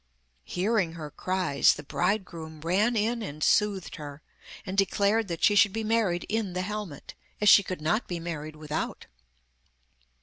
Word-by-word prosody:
Hearing 190 Hz, -2 st, 0 dB
her 155 Hz, -3 st, -7 dB
cries 185 Hz, -4 st, +2 dB
the 150 Hz, -, -9 dB
bridegroom 170 Hz, -3 st, -2 dB
ran 200 Hz, +9 st, +1 dB
in 230 Hz, +2 st, 0 dB
and 155 Hz, -7 st, -5 dB
soothed 205 Hz, -4 st, +1 dB
her, 145 Hz, -1 st, -9 dB, 0.4 s
and 185 Hz, -, -4 dB
declared 200 Hz, +2 st, +2 dB
that 170 Hz, -3 st, -5 dB
she 210 Hz, -, +6 dB
should 205 Hz, -1 st, +5 dB
be 225 Hz, 0 st, -2 dB
married 215 Hz, -6 st, +1 dB
in 215 Hz, -4 st, -2 dB
the 180 Hz, 0 st, -2 dB
helmet, 205 Hz, -7 st, -6 dB, 0.3 s
as 210 Hz, -, +5 dB
she 200 Hz, -, +9 dB
could 185 Hz, -4 st, -6 dB
not 215 Hz, +9 st, 0 dB
be 175 Hz, -2 st, -4 dB
married 155 Hz, -2 st, -6 dB
without. 155 Hz, 0 st, -4 dB
185 Hz, 160 wpm, -27 LUFS, 160-210 Hz, 0.4 s, she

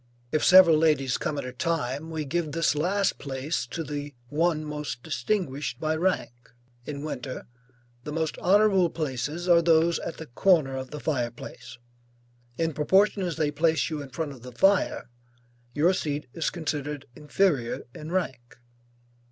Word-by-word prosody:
If 155 Hz, -, +1 dB
several 180 Hz, -4 st, +8 dB
ladies 145 Hz, -5 st, +2 dB
come 145 Hz, -, -2 dB
at 140 Hz, -, -3 dB
a 130 Hz, -, -6 dB
time, 145 Hz, +1 st, -2 dB
we 160 Hz, -2 st, -3 dB
give 155 Hz, 0 st, -2 dB
this 165 Hz, 0 st, +2 dB
last 185 Hz, +6 st, 0 dB
place 135 Hz, 0 st, -3 dB
to 165 Hz, +7 st, -4 dB
the 145 Hz, -1 st, -6 dB
one 155 Hz, +1 st, +1 dB
most 150 Hz, -5 st, -5 dB
distinguished 145 Hz, -, -2 dB
by 155 Hz, 0 st, 0 dB
rank. 180 Hz, -2 st, 0 dB, 0.6 s
In 145 Hz, -1 st, -5 dB
winter, 130 Hz, -4 st, -5 dB, 0.6 s
the 150 Hz, -, -6 dB
most 160 Hz, 0 st, -1 dB
honorable 195 Hz, -2 st, +4 dB
places 150 Hz, +3 st, -3 dB
are 170 Hz, -1 st, +6 dB
those 165 Hz, 0 st, +3 dB
at -, -, -6 dB
the 160 Hz, -, -7 dB
corner 150 Hz, 0 st, +2 dB
of 130 Hz, -1 st, -5 dB
the 150 Hz, -, -7 dB
fire 130 Hz, -6 st, -1 dB
place; 120 Hz, 0 st, -11 dB, 0.8 s
in 165 Hz, -1 st, 0 dB
proportion 195 Hz, +8 st, +3 dB
as 175 Hz, -4 st, -2 dB
they 155 Hz, -2 st, 0 dB
place 160 Hz, +2 st, +1 dB
you 155 Hz, -2 st, -3 dB
in 140 Hz, -, -8 dB
front 145 Hz, +3 st, -4 dB
of 130 Hz, -4 st, -11 dB
the 125 Hz, +1 st, -9 dB
fire, 195 Hz, +3 st, +2 dB, 0.7 s
your 165 Hz, +6 st, +4 dB
seat 150 Hz, -4 st, -2 dB
is 165 Hz, -, -1 dB
considered 150 Hz, -4 st, -4 dB
inferior 150 Hz, -5 st, 0 dB
in 155 Hz, +3 st, -8 dB
rank. 130 Hz, -10 st, -3 dB
155 Hz, 160 wpm, -26 LUFS, 140-170 Hz, 0.8 s, several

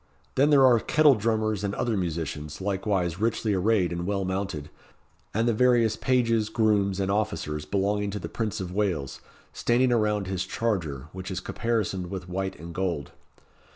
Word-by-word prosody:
Then 140 Hz, +3 st, +3 dB
there 140 Hz, -3 st, +6 dB
are 120 Hz, -3 st, +6 dB
kettle 150 Hz, +4 st, +5 dB
drummers 110 Hz, -2 st, 0 dB
and 100 Hz, 0 st, -1 dB
other 120 Hz, -2 st, 0 dB
musicians, 80 Hz, -4 st, -3 dB
likewise 95 Hz, -3 st, -1 dB
richly 110 Hz, -1 st, 0 dB
arrayed 95 Hz, -1 st, +2 dB
and 85 Hz, +1 st, -3 dB
well 100 Hz, -1 st, -1 dB
mounted, 95 Hz, -6 st, -3 dB, 0.6 s
and 115 Hz, +3 st, 0 dB
the 120 Hz, -, +3 dB
various 120 Hz, -1 st, +3 dB
pages, 115 Hz, -4 st, +1 dB
grooms, 105 Hz, -4 st, +2 dB
and 95 Hz, 0 st, 0 dB
officers 100 Hz, -8 st, -2 dB
belonging 100 Hz, +4 st, 0 dB
to 100 Hz, -, -4 dB
the -, -, -5 dB
Prince 110 Hz, -3 st, -3 dB
of 90 Hz, -2 st, -5 dB
Wales, 90 Hz, -10 st, -1 dB, 0.3 s
standing 125 Hz, +1 st, +2 dB
around 105 Hz, -3 st, +1 dB
his 95 Hz, -1 st, -2 dB
charger, 85 Hz, -, -2 dB
which 95 Hz, +1 st, -6 dB
is 95 Hz, -2 st, -3 dB
caparisoned 105 Hz, -7 st, -2 dB
with 95 Hz, -1 st, -6 dB
white 95 Hz, +1 st, -3 dB
and 85 Hz, +2 st, -9 dB
gold. 85 Hz, -6 st, -2 dB
100 Hz, 165 wpm, -26 LUFS, 90-110 Hz, 0.6 s, there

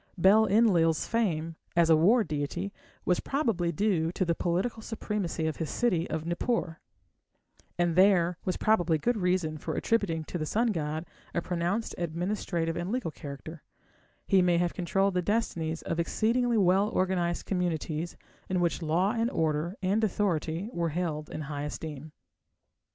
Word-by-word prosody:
Bel 200 Hz, +5 st, +5 dB
Enlil's 180 Hz, -7 st, +3 dB
fame 165 Hz, -8 st, -1 dB, 0.2 s
as 170 Hz, -1 st, +4 dB
a -, -, +8 dB
war 210 Hz, +10 st, +5 dB
deity 155 Hz, +5 st, -3 dB, 0.3 s
was 180 Hz, -, +2 dB
probably 225 Hz, -, 0 dB
due 170 Hz, -2 st, +1 dB
to 185 Hz, -, 0 dB
the 170 Hz, -, +2 dB
political 185 Hz, +8 st, -1 dB
supremacy 210 Hz, -7 st, -3 dB
of 160 Hz, -, -2 dB
his 160 Hz, -, -3 dB
city 185 Hz, -9 st, 0 dB
of 160 Hz, 0 st, -3 dB
Nippur; 175 Hz, -1 st, -1 dB, 1.0 s
and 175 Hz, -2 st, +1 dB
there 180 Hz, -2 st, +5 dB
was 185 Hz, -, -1 dB
probably 175 Hz, -7 st, +2 dB
good 240 Hz, +11 st, 0 dB
reason 180 Hz, -5 st, 0 dB
for -, -, -4 dB
attributing 200 Hz, -9 st, 0 dB
to 175 Hz, -, -5 dB
the 155 Hz, -, -1 dB
sun 230 Hz, +5 st, +1 dB
god 155 Hz, -2 st, -3 dB, 0.3 s
a 170 Hz, -, +1 dB
pronounced 180 Hz, +5 st, -1 dB
administrative 170 Hz, -1 st, -2 dB
and 175 Hz, +3 st, -3 dB
legal 240 Hz, -9 st, -2 dB
character; 150 Hz, +2 st, -9 dB, 0.6 s
he 195 Hz, -1 st, +4 dB
may 175 Hz, -1 st, +3 dB
have 175 Hz, 0 st, +1 dB
controlled 195 Hz, +2 st, +1 dB
the 180 Hz, -, +1 dB
destinies 170 Hz, -6 st, -1 dB
of 165 Hz, -, -2 dB
exceedingly 230 Hz, +7 st, +1 dB
well 195 Hz, +1 st, +4 dB
organized 180 Hz, -3 st, 0 dB
communities 170 Hz, -3 st, -2 dB, 0.3 s
in 185 Hz, -1 st, +1 dB
which 175 Hz, 0 st, 0 dB
law 170 Hz, +5 st, +2 dB
and 230 Hz, 0 st, 0 dB
order 160 Hz, -, -1 dB
and 200 Hz, +4 st, +1 dB
authority 180 Hz, -3 st, 0 dB
were 170 Hz, -1 st, 0 dB
held 155 Hz, -2 st, -3 dB
in -, -, -5 dB
high 145 Hz, -1 st, -5 dB
esteem. 150 Hz, 0 st, -6 dB
175 Hz, 155 wpm, -29 LUFS, 160-200 Hz, 1.0 s, a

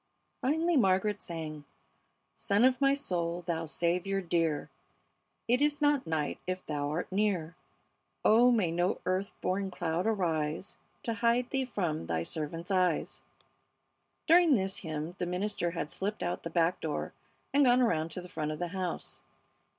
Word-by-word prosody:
Finally 320 Hz, +4 st, +2 dB
Margaret 200 Hz, -1 st, +2 dB
sang: 155 Hz, -3 st, -6 dB, 0.7 s
"Sun 200 Hz, +3 st, +1 dB
of 260 Hz, +1 st, +3 dB
my 275 Hz, 0 st, +5 dB
soul, 175 Hz, -9 st, -2 dB
Thou 165 Hz, -1 st, -2 dB
Saviour 180 Hz, +5 st, 0 dB
dear, 165 Hz, -4 st, 0 dB, 0.8 s
It 245 Hz, +3 st, +3 dB
is 295 Hz, 0 st, +2 dB
not 290 Hz, -, +2 dB
night 155 Hz, -2 st, -1 dB
if 185 Hz, 0 st, -3 dB
Thou 145 Hz, -1 st, -2 dB
art 165 Hz, +5 st, -3 dB
near, 190 Hz, -5 st, 0 dB, 0.7 s
Oh, 235 Hz, +3 st, +6 dB
may 205 Hz, -8 st, +2 dB
no 175 Hz, +2 st, 0 dB
earth 185 Hz, +2 st, -2 dB
born 195 Hz, +1 st, -1 dB
cloud 175 Hz, +1 st, -1 dB
arise 165 Hz, -5 st, -1 dB, 0.3 s
To 230 Hz, -, -1 dB
hide 235 Hz, +2 st, +1 dB
Thee 265 Hz, -1 st, +1 dB
from 175 Hz, -, -2 dB
Thy 80 Hz, -1 st, -1 dB
servant's 165 Hz, -, -4 dB
eyes." 185 Hz, -2 st, +1 dB, 1.0 s
During 335 Hz, -3 st, +6 dB
this 195 Hz, -2 st, -1 dB
hymn 160 Hz, -1 st, -4 dB
the 180 Hz, -, -1 dB
minister 180 Hz, 0 st, -1 dB
had 165 Hz, -3 st, -4 dB
slipped 205 Hz, +2 st, -3 dB
out 175 Hz, -, -2 dB
the 165 Hz, -, -5 dB
back 170 Hz, +1 st, +2 dB
door 155 Hz, -2 st, -3 dB, 0.4 s
and 285 Hz, 0 st, +5 dB
gone 245 Hz, 0 st, +5 dB
around 165 Hz, -10 st, +2 dB
to 180 Hz, -, -4 dB
the 180 Hz, -, -10 dB
front 155 Hz, -4 st, -3 dB
of 155 Hz, -, -4 dB
the 175 Hz, +1 st, -3 dB
house. 185 Hz, -1 st, -4 dB
180 Hz, 160 wpm, -31 LUFS, 165-220 Hz, 1.0 s, Oh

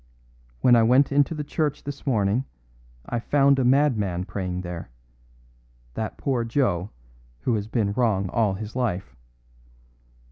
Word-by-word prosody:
"When 120 Hz, -, +6 dB
I 115 Hz, -, +5 dB
went 125 Hz, +6 st, +4 dB
into 145 Hz, +3 st, +2 dB
the 150 Hz, -, -3 dB
church 150 Hz, 0 st, -2 dB
this 145 Hz, 0 st, -8 dB
morning 110 Hz, 0 st, +1 dB, 0.6 s
I 120 Hz, -, -2 dB
found 140 Hz, +2 st, +3 dB
a -, -, +2 dB
madman 120 Hz, -9 st, +2 dB
praying 90 Hz, -2 st, -4 dB
there 90 Hz, -2 st, -7 dB, 1.0 s
that 110 Hz, -, -4 dB
poor 130 Hz, -4 st, -1 dB
Joe, 115 Hz, -7 st, 0 dB, 0.5 s
who 125 Hz, -, 0 dB
has 105 Hz, -1 st, -2 dB
been 110 Hz, -3 st, 0 dB
wrong 105 Hz, -5 st, +1 dB
all 105 Hz, -3 st, +1 dB
his 110 Hz, +3 st, -7 dB
life. 110 Hz, -8 st, -2 dB
115 Hz, 140 wpm, -24 LUFS, 100-135 Hz, 1.0 s, When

